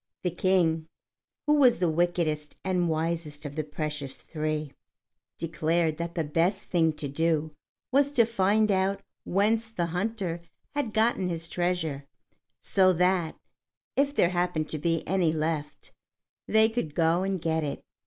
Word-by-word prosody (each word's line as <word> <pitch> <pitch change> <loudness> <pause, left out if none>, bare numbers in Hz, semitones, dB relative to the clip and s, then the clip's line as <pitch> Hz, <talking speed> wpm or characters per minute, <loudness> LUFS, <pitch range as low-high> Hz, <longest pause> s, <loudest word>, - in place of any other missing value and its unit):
The 180 - 0
King, 170 -3 +2 0.6
who 295 - +4
was 270 -5 +5
the 180 - +1
wickedest 160 -2 0
and 180 -2 +1
wisest 160 -2 -2
of 145 0 -6
the 155 - -1
precious 150 -2 -4
three, 155 -2 -3 0.6
declared 165 -1 0
that 170 0 -4
the 165 - 0
best 170 +6 0
thing 165 -3 +2
to 150 -1 -5
do 160 +2 0 0.4
was 280 +2 +3
to 235 -4 +5
find 215 -1 +2
out 195 +1 +1 0.2
whence 220 +4 +1
the 180 -6 -2
hunter 180 0 -2 0.3
had 285 -6 -1
got 225 +2 +3
his 170 -3 -2
treasure, 165 -6 -2 0.5
so 185 -1 +4
that, 180 -1 +1 0.6
if 280 +1 +1
there 170 - +4
happened 175 -3 -1
to 155 - -2
be 165 +1 -1
any 180 -3 +2
left, 155 -1 -3 0.6
they 220 0 +5
could 220 -10 -3
go 165 +1 +3
and 190 -1 -1
get 160 -1 0
it. 145 - -4
170 Hz, 150 wpm, -27 LUFS, 155-190 Hz, 0.6 s, was